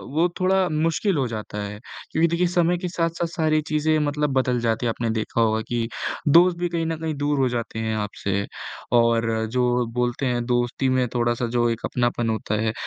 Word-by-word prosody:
वो 165 +3 +4
थोड़ा 185 0 +3
मुश्किल 165 +4 +1
हो 135 -3 +1
जाता 105 -2 -5
है। 105 +1 -6 0.3
क्योंकि 160 +2 +3
देखिए 170 +2 +1
समय 175 0 +2
के 180 +1 -4
साथ-साथ 170 0 -1
सारी 155 -2 +1
चीज़ें 155 +1 +2
मतलब 150 -1 0
बदल 125 -1 +1
जाती 115 0 0
हैं - - +2
आपने 115 0 -2
देखा 110 +1 -1
होगा 110 -1 +2
कि 120 -1 -1 0.4
दोस्त 170 +4 +6
भी 175 0 -1
कहीं 170 -1 -1
न 165 0 -1
कहीं 160 -1 -2
दूर 145 0 0
हो 130 -2 +3
जाते 115 -2 -3
हैं 110 -1 -1
आपसे 100 -1 -2 0.5
और 115 -1 +2
जो 125 0 +1
बोलते 125 +2 -1
हैं 120 -2 0
दोस्ती 120 +2 0
में 130 -1 +2
थोड़ा-सा 120 0 +1
जो 120 0 +1
एक 115 -1 -2
अपनापन 120 -1 0
होता 110 -1 -1
है, 110 -1 0
125 Hz, 200 wpm, -23 LUFS, 115-160 Hz, 0.5 s, दोस्त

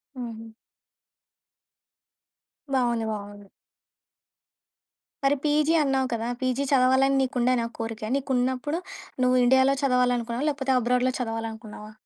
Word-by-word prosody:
హుహు. 230 -3 -7 2.3
బావుంది. 240 -3 +1
బావుంది. 205 -1 -7 1.8
మరి 275 +1 +3
పీజీ 300 +2 +2
అన్నావు 265 -2 +1
కదా! 230 0 -2
పీజీ 255 +2 0
చదవాలని 265 +1 +4
నీకుండేనా 250 -2 +1
కోరిక? 225 -1 -5
నీకున్నప్పుడు, 260 +3 -1 0.4
నువ్వు 255 0 +3
ఇండియాలో 265 +2 +4
చదవాలనుకున్నావా? 250 0 +1
లేకపోతే 270 -2 -1
అబ్రాడ్‌లో 250 +1 +1
చదవాలనుకున్నావా? 225 -2 -6
250 Hz, 90 wpm, -25 LUFS, 230-265 Hz, 2.3 s, చదవాలని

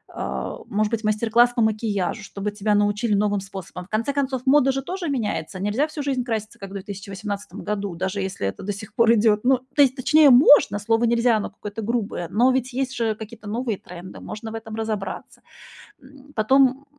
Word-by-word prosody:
э, - - -4
может 210 +1 0
быть, 225 - -1
мастер-класс 230 +3 +3
по 235 - +1
макияжу, 215 -2 -1
чтобы 200 +1 -4
тебя 210 0 0
научили 205 +2 +1
новым 205 0 +1
способам. 190 -2 -8
В - - -25
конце 225 +6 -1
концов, 270 -2 -1
мода 270 0 +5
же 270 0 -3
тоже 360 +2 -4
меняется. 220 -6 -3
Нельзя 210 +9 +1
всю 305 -1 -6
жизнь 265 -3 -1
краситься, 220 -3 -4
как 195 - -8
в 195 - -11
2018 200 +1 -6
году, 200 -3 -3
даже 190 +3 -2
если 190 - -3
это 95 - -5
до 205 +1 -2
сих 210 +1 -10
пор 230 0 +4
идёт 215 -1 +3
ну, 260 0 +4 0.2
то 290 - +5
есть, 265 -2 +4
точнее, 295 +3 +5
можно, 255 -3 +6
слово 225 +3 +1
нельзя 235 -1 +3
оно 205 - -3
какое-то 210 +2 -7
грубое, 210 -6 -2
но 235 +8 +3
ведь 255 -1 -1
есть 265 0 -2
же 225 -2 0
какие-то 220 0 -9
новые 230 -1 -2
тренды, 180 +1 -10
можно 220 +1 -7
в 225 - -6
этом 220 -1 -7
разобраться. 220 -3 -5 0.6
М, 280 +1 -17
потом 265 +4 +3
220 Hz, 200 wpm, -23 LUFS, 205-255 Hz, 0.6 s, можно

